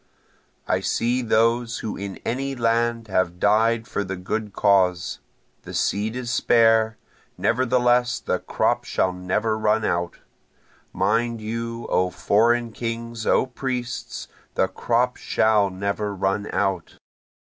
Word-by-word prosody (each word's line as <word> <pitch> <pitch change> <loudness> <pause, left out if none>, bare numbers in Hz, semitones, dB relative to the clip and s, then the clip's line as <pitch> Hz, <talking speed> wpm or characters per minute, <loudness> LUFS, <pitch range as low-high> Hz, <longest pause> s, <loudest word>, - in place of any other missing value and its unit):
I - - +2
see 120 +2 0
those 115 +1 +2
who 110 - -3
in 100 -1 -6
any 135 +3 -2
land 115 -1 0
have 95 -3 0
died 110 +3 +2
for 100 - -2
the 95 0 -4
good 105 +4 -3
cause, 95 -3 +2 0.4
The - - -9
seed 105 +3 0
is 125 -1 -3
spare, 115 -2 +3 0.4
nevertheless 125 0 +2
the 90 - -1
crop - - 0
shall 95 - 0
never 95 +5 -1
run 110 0 +2
out, 85 0 -1 0.7
(Mind 115 +5 0
you 115 +2 -4
O 90 0 +2
foreign 115 +6 +2
kings, 115 0 -5
O - - +4
priests, 125 -1 -4 0.3
the - - +2
crop - - 0
shall 105 -2 +2
never 100 +2 -3
run 100 +2 -1
out.) 95 -3 -1
110 Hz, 125 wpm, -23 LUFS, 100-120 Hz, 0.7 s, O